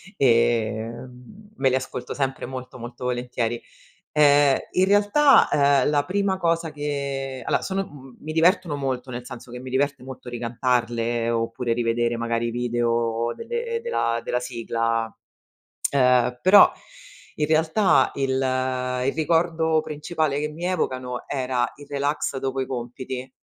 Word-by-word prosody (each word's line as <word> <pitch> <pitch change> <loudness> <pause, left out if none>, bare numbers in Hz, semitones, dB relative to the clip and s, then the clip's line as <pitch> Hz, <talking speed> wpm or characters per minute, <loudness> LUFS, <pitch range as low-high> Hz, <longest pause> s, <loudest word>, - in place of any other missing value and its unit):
e, 115 -3 +3 0.2
mhmm, 125 - -12
me 135 - +2
li 130 - +1
ascolto 125 -1 -4
sempre 135 -1 -2
molto, 130 0 -8
molto 120 +1 -9
volentieri. 120 -1 -2 0.5
Ehm, 145 -2 +5
in 185 +1 +3
realtà, 205 +9 +5 0.4
ehm, - - +2
la 145 -1 +2
prima 195 +2 0
cosa 165 -2 0
che 140 -2 -4
allora, - - +1
sono, 195 0 -2
mhmm, 135 -5 -14
mi 155 - -6
divertono 170 0 +3
molto, 130 -2 -3
nel 120 0 -6
senso 125 -1 -10
che 125 - -7
mi 130 0 -8
diverte 140 +1 0
molto 130 -1 -10
ricantarle 120 -1 -1
oppure 115 +1 -1
rivedere 120 0 0
magari 115 0 -1
i - - -2
video 120 -1 0
delle 470 0 -3
della 115 - 0
della 125 - -1
sigla, 115 -2 -2 0.8
ehm, 125 -2 +3
però 200 +2 +8 0.7
in 150 - 0
realtà 160 +6 +3
il 135 -1 -1 0.8
il 135 - +1
ricordo 160 0 +2
principale 150 -1 -2
che 150 +1 -1
mi 160 +3 -7
evocano 130 -8 -2
era 130 -2 -1
il 145 0 -13
relax 145 0 -1
dopo 135 0 -2
i 130 - -2
compiti. 125 +1 -5
130 Hz, 145 wpm, -24 LUFS, 120-150 Hz, 0.8 s, però